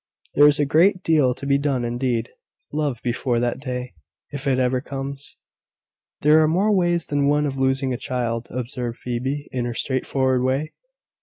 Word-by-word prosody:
"There 145 +1 +7
is 145 - +4
a 145 - +2
great 180 +6 +3
deal 145 -6 +3
to 140 - -7
be 140 0 +2
done 135 -4 0
indeed, 120 -1 -1 0.4
love, 145 -4 -1
before 120 0 0
that 120 +1 -1
day, 125 -2 -5 0.4
if 145 0 -5
it 130 -2 +2
ever 130 0 +1
comes." 135 0 -6 0.8
"There 155 +2 +6
are 155 - +4
more 190 +7 +2
ways 175 -2 +1
than 145 -1 0
one 145 +1 +2
of 140 -2 -2
losing 135 0 +1
a - - -2
child," 120 -2 -3
observed 120 -1 -4
Phoebe, 130 +4 -3
in 125 -2 -2
her 120 -1 -4
straightforward 130 0 0
way. 135 +4 -1
135 Hz, 175 wpm, -22 LUFS, 125-145 Hz, 0.8 s, There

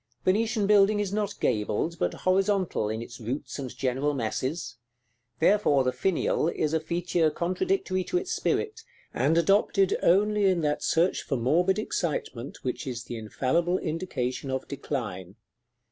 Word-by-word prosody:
Venetian 220 +2 +2
building 205 0 +5
is 200 -1 -2
not 205 -1 -2
gabled, 110 +8 0
but - - 0
horizontal 190 - +1
in 110 +1 -3
its 120 +1 -11
roots 130 +4 -4
and 130 -3 -6
general 135 +3 0
masses; 125 +2 -3 0.6
therefore 165 -6 +3
the 130 - +1
finial 170 0 0
is 155 -2 -1
a 160 - +3
feature 170 0 0
contradictory 185 - -1
to 360 - 0
its 365 0 -3
spirit, 445 +1 -1 0.3
and 165 - +2
adopted 195 +2 +3
only 205 +3 +3
in 185 -3 +3
that 150 -1 0
search 170 +3 +2
for 135 - -2
morbid 175 - +2
excitement 145 - -3
which 130 +1 -3
is 120 -2 -4
the 120 - -7
infallible 140 +11 0
indication 155 -7 -3
of 130 0 -3
decline. 105 -10 -5
165 Hz, 145 wpm, -27 LUFS, 130-195 Hz, 0.6 s, building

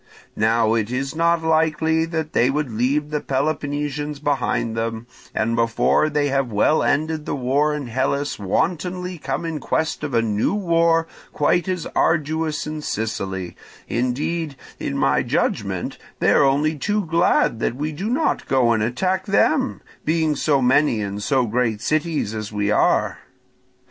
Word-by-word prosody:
Now 110 +1 +2
it 110 -2 0
is 135 +4 -3
not 170 0 +2
likely 160 0 +2
that 160 -2 -4
they 125 - +3
would 145 -2 -1
leave 140 +7 0
the 150 -1 -1
Peloponnesians 145 +1 -2
behind 135 -5 -1
them, 115 0 -3 0.3
and 115 +2 +1
before 115 +6 +2
they 145 -1 +1
have 135 -3 0
well 105 +9 +3
ended 155 +1 0
the - - -1
war 140 +3 +1
in 145 -2 -4
Hellas 135 +3 -1
wantonly 180 - -1
come 170 - -3
in 160 -2 -3
quest 160 +3 -1
of 140 -4 -2
a 115 - +3
new 110 - 0
war 165 -4 +2 0.3
quite 175 +5 +1
as 180 -3 -2
arduous 155 0 +1
in 155 0 -5
Sicily; 95 -7 -3 0.3
indeed, 140 +6 -1 0.2
in - - -3
my - - +2
judgment, - - -1 0.2
they - - +3
are - - +5
only 145 +3 +2
too 210 +4 0
glad 165 -8 +2
that 115 - -1
we 150 +4 -3
do 190 +9 -4
not 285 +7 0
go 130 -3 +3
and 110 -2 +2
attack 185 - -1
them, 260 +7 +2 0.2
being 160 -1 +1
so 140 -2 +1
many 130 -1 +3
and 100 0 -4
so 130 +3 +2
great 115 -1 0
cities 155 -5 -1
as 110 -1 -5
we 105 0 0
are. - - +2
145 Hz, 160 wpm, -22 LUFS, 120-160 Hz, 0.3 s, are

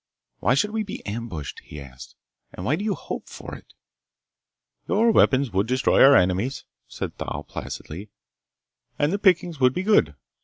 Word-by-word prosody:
"Why 120 - +2
should 210 +9 +1
we 220 0 -1
be 205 -2 -7
ambushed?" 100 - -5
he 75 - -11
asked. 65 -2 -12 0.4
"And 90 - -7
why 140 - +2
do 200 - -5
you 210 -2 0
hope - - -7
for - - -9
it?" - - -13 1.1
"Your 225 +3 +3
weapons 135 - +3
would 95 +3 0
destroy 130 +2 +3
our 135 +1 +8
enemies," 95 +9 +1 0.2
said - - -6
Thal 75 - -4
placidly, 95 +7 -7 0.9
"and 145 +4 +1
the 200 - -1
pickings 180 -5 +2
would 130 -1 +4
be 185 - -1
good." 85 - +3
130 Hz, 165 wpm, -24 LUFS, -, 1.1 s, our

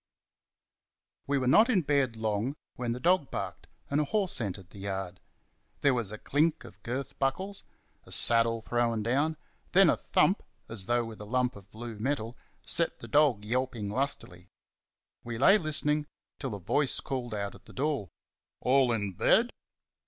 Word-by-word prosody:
We 140 0 +1
were 130 - -1
not 215 - +6
in 195 -8 +3
bed 140 -5 +1
long 110 +4 -1 0.2
when 120 -1 -2
the 120 - -3
dog 175 -1 +2
barked - - -5 0.2
and 145 +2 +1
a - - 0
horse 190 - +1
entered 95 -4 -5
the 100 - -12
yard. 95 -2 -4 0.6
There 140 - +4
was 115 -5 -1
a 110 - -6
clink 150 +7 +1
of - - -14
girth 130 +4 -5
buckles; 190 +9 -1 0.4
a - - -13
saddle 115 -1 +4
thrown 115 -2 0
down; 145 +7 +1 0.4
then - - +7
a - - 0
thump, - - +2 0.3
as 105 -4 0
though 120 0 +2
with 110 -2 -9
a - - -7
lump 125 +3 0
of 100 -1 -14
blue 115 -1 -8
metal, 120 -1 -2 0.3
set 170 0 0
the - - -9
dog 145 -8 +3
yelping 120 -3 -2
lustily. 105 -9 -3 0.8
We 115 -1 -5
lay 195 - +6
listening 150 -2 0 0.3
till 130 -7 -3
a - - -7
voice 130 - +1
called 120 -4 -4
out 100 -1 -3
at - - -16
the - - -14
door 135 - -1 0.5
"All 130 -1 +3
in 105 -4 -1
bed?" 235 - +3
125 Hz, 170 wpm, -29 LUFS, 110-145 Hz, 0.8 s, then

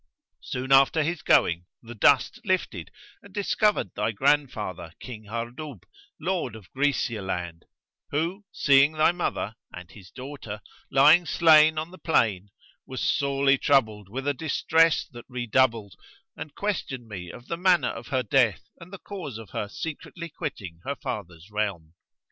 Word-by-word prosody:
Soon 130 +1 -5
after 135 +4 +5
his 170 +1 -2
going, 85 +1 +3 0.2
the 120 +1 -9
dust 140 - +3
lifted 180 - -1 0.3
and 200 - -16
discovered 205 - +1
thy 105 +2 -1
grandfather, 110 - 0
King 110 -4 -9
Hardub, 120 - -6 0.4
Lord 170 - -2
of 105 -5 -14
Grćcia 130 -6 0
land, 85 -3 -4 0.4
who, 170 +7 -2
seeing 140 +1 +4
thy 155 +1 +4
mother 170 - -3
(and 90 -1 -10
his 95 -4 -14
daughter) 130 -6 -8 0.3
lying 155 +6 +6
slain 155 -2 +6
on 160 +2 -3
the 185 - -13
plain, 105 - +1 0.4
was 130 -1 -6
sorely 140 -1 +2
troubled 110 -8 +2
with 135 +6 -5
a 145 - +2
distress 160 +2 +2
that 120 -2 -11
redoubled, 120 -4 +1 0.4
and 150 - -8
questioned 145 - -3
me 90 -5 -7
of 120 - -11
the 170 - -2
manner 180 0 +3
of - - -9
her 130 -4 0
death 120 -10 +2 0.2
and 170 +2 -13
the 195 - -7
cause 180 - -7
of 110 -5 -11
her 105 - -3
secretly 165 +5 -7
quitting 100 - -6
her 140 - -3
father's 90 -6 -7
realm. 100 -7 -3
130 Hz, 150 wpm, -26 LUFS, 105-155 Hz, 0.4 s, lying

